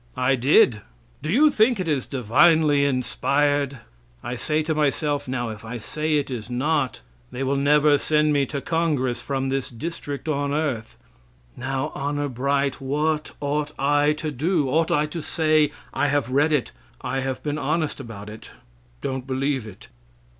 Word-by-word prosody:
"I 130 +1 +2
did." 125 -4 +4 0.4
"Do 155 +3 -3
you 295 +8 +5
think 225 -2 +3
it 185 - -2
is 145 -4 0
divinely 145 +4 +4
inspired?" 140 +1 0 0.4
I 125 - -4
say 155 +5 0
to 160 +1 -1
myself, 150 -1 0
"Now 125 -2 -2
if 110 -1 -8
I 115 +2 -5
say 155 +7 -2
it 140 -2 -2
is 120 -2 -5
not, 135 - 0 0.3
they 130 - -4
will 135 +1 0
never 145 +1 +4
send 150 0 +2
me 140 -2 +2
to 140 -2 -4
Congress 145 -8 0
from 135 -1 -2
this 135 -1 -2
district 145 +2 -6
on 145 -2 0
earth." 140 -7 -2 0.6
Now, 135 +3 -3
honor 145 +1 -2
bright, 140 +2 0
what 150 +3 -1
ought 150 +1 -2
I 145 +2 +3
to 155 0 -4
do? 150 +2 0
Ought 160 +4 +2
I 150 - +2
to 160 +2 -5
say, 155 -1 +2 0.2
"I 145 - +1
have 140 -3 0
read 145 +4 +3
it. 145 -5 +1 0.3
I 135 +2 -2
have 130 -1 -3
been 150 0 -2
honest 155 +2 -1
about 115 -6 -8
it; 110 +1 -10 0.5
don't 130 -1 -4
believe 135 -2 -1
it?" 90 - -12
140 Hz, 170 wpm, -23 LUFS, 130-150 Hz, 0.6 s, you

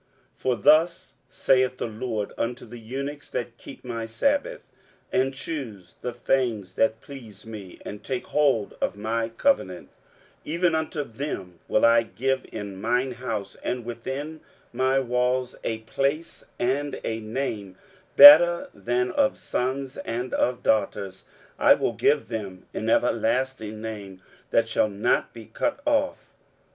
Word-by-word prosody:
23:056:004 - - -39
For 130 -1 +1
thus 160 - +3 0.2
saith 130 -1 +2
the - - -3
LORD 110 -2 -4
unto 120 +1 -3
the 120 +1 -10
eunuchs 140 +6 -6
that 120 -1 -5
keep 135 - -12
my 115 -2 -4
sabbaths, 285 - -1 0.4
and 130 +1 +2
choose 130 - -7
the 125 - -3
things 120 -6 -1
that 110 +2 +1
please 115 -8 -12
me, 105 -5 -9
and 105 - -8
take 130 -2 -3
hold 140 -8 +1
of - - 0
my 115 +2 -2
covenant; 275 - 0
23:056:005 - - -34 0.5
Even 170 +2 +1
unto 160 -1 -1
them 110 - -6
will 110 - +3
I 115 0 +6
give 130 +3 -2
in 100 -3 -7
mine 125 +4 +1
house 115 -6 -5
and 125 -2 -3
within 135 +7 -5 0.3
my 130 +2 +2
walls 125 0 0
a 110 - -1
place 140 +8 -2
and 140 +4 -1
a 110 0 -2
name 110 -4 -4 0.4
better 165 +5 +10
than 120 +5 -1
of 275 -2 +1
sons 130 +2 -3
and 120 +2 -4
of 125 0 0
daughters: 100 -3 0 0.3
I - - +7
will - - -1
give 145 -6 +2
them 100 -5 -6
an 110 - -2
everlasting 115 -1 0
name, 100 -4 -7 0.3
that - - +2
shall 110 - +1
not 100 +1 0
be 115 -2 -11
cut 290 - -2
off. 285 -1 0
120 Hz, 145 wpm, -25 LUFS, 110-135 Hz, 0.5 s, better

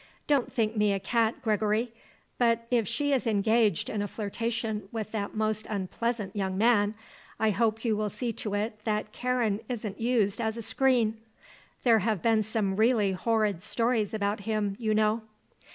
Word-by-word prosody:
Don't 285 -4 +1
think 225 -1 0
me 210 -1 +3
a 195 - -1
cat, 225 +3 0
Gregory; 215 +1 +1 0.5
but 230 -1 +2
if 235 -4 +2
she 285 +5 0
is 260 -3 +1
engaged 220 -2 +2
in 210 - -2
a 205 - -1
flirtation 220 -1 -3
with 215 -2 -4
that 205 -2 -3
most 215 0 0
unpleasant 210 +1 -2
young 190 -2 -1
man 210 -1 +3 0.4
I 220 -1 +3
hope 225 +2 0
you 220 -2 +2
will 210 0 -1
see 235 +2 -3
to 205 -1 -3
it 215 +1 -2
that 215 -1 -1
Karen 245 -5 0
isn't 220 -4 -4
used 230 -3 +1
as 220 0 -1
a 230 - -4
screen. 225 -1 +1 0.6
There 230 -3 +5
have 215 -2 -1
been 225 -2 +4
some 210 -2 -1
really 220 -3 +3
horrid 210 -2 0
stories 230 0 0
about 205 -1 -1
him, 205 -1 -1
you 220 -2 +1
know." 215 +1 +2
220 Hz, 170 wpm, -28 LUFS, 210-230 Hz, 0.6 s, There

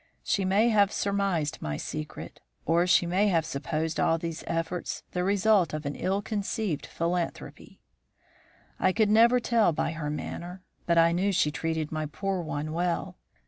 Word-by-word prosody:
She 195 - 0
may 205 +5 +3
have 205 -3 +4
surmised 195 -7 -1
my 75 -1 -3
secret, 75 - -6 0.3
or 170 +2 +3
she 180 - +4
may 185 +4 +2
have 165 -5 +2
supposed 155 +2 -3
all 165 - +3
these 165 0 -5
efforts 165 +1 -3
the 180 - -1
result 200 -3 +3
of 155 0 -6
an 140 - -2
ill 195 +2 -1
conceived 205 - -2
philanthropy. 170 +1 -4 1.0
"I 185 - +3
could 215 0 +2
never 235 +3 +6
tell 230 -5 +3
by 155 - -1
her 155 -2 -4
manner. 175 +4 -6 0.2
But 170 -1 +3
I 165 0 +6
knew 185 +4 +1
she 150 -5 +2
treated 160 +1 -2
my 155 -1 -2
poor 195 +4 -2
one 155 -1 -4
well. 170 - -2
175 Hz, 165 wpm, -28 LUFS, 160-200 Hz, 1.0 s, never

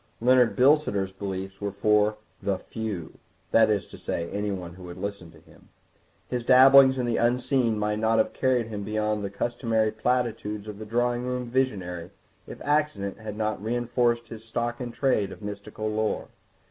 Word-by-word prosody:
Leonard 125 0 +4
Bilsiter's 125 -8 +3
beliefs 95 0 -6
were 100 0 -2
for 105 +1 +2 0.2
"the 100 -2 0
few," 105 -5 -6 0.3
that 110 -1 +5
is 100 -4 +1
to - - -13
say, 85 0 -3
anyone 95 -4 -3
who 90 +1 -11
would 90 0 -9
listen 100 -4 -5
to - - -17
him. - - -21 0.6
His 125 -1 -3
dabblings 130 +1 +7
in 125 - 0
the 120 -1 0
unseen 125 -1 +1
might 105 0 -1
not 110 +1 +2
have 110 - +2
carried 130 -3 +1
him 105 -2 -5
beyond 105 0 -1
the 100 - -2
customary 110 +1 0
platitudes 110 -3 -1
of 105 -1 -7
the 110 - -7
drawing 120 +2 0
room 125 0 -2
visionary 105 -9 -2 0.4
if - - -9
accident 145 -11 0
had 105 -1 -7
not 110 -2 -1
reinforced 120 0 0
his 110 -1 -9
stock 120 +2 -3
in 120 -1 -4
trade 115 -6 +1
of 105 - -11
mystical 105 +1 -5
lore. 110 0 -1
110 Hz, 170 wpm, -26 LUFS, 100-120 Hz, 0.6 s, dabblings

